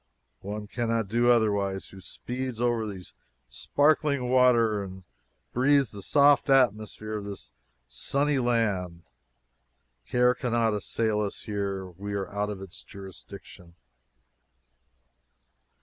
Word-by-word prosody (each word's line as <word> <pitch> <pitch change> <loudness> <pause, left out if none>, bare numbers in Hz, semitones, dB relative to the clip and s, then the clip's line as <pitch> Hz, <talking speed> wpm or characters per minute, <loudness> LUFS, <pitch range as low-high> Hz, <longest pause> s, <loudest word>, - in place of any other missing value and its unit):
One 105 +2 -6
can 115 +2 -3
not 115 -3 0
do 120 +2 +2
otherwise 100 -5 +1
who 95 - -13
speeds 125 +3 -6
over 120 -2 0
these 95 -3 -9 0.4
sparkling 145 -3 +1
waters 115 -6 +3
and 95 0 -12 0.5
breathes 135 -1 +3
the 100 - -9
soft 140 +5 +4
atmosphere 110 -4 +1
of 100 - -8
this 100 -11 -9 0.4
sunny 140 - -1
land. 100 -8 -1 1.0
Care 125 0 +3
cannot 120 -3 0
assail 105 +1 -1
us 100 -1 -4
here. 100 -2 -3
We 100 +3 -7
are 100 0 -4
out 105 0 -1
of 100 -2 -6
its 95 +2 -12
jurisdiction. 95 -3 -12
110 Hz, 120 wpm, -27 LUFS, 100-125 Hz, 1.0 s, soft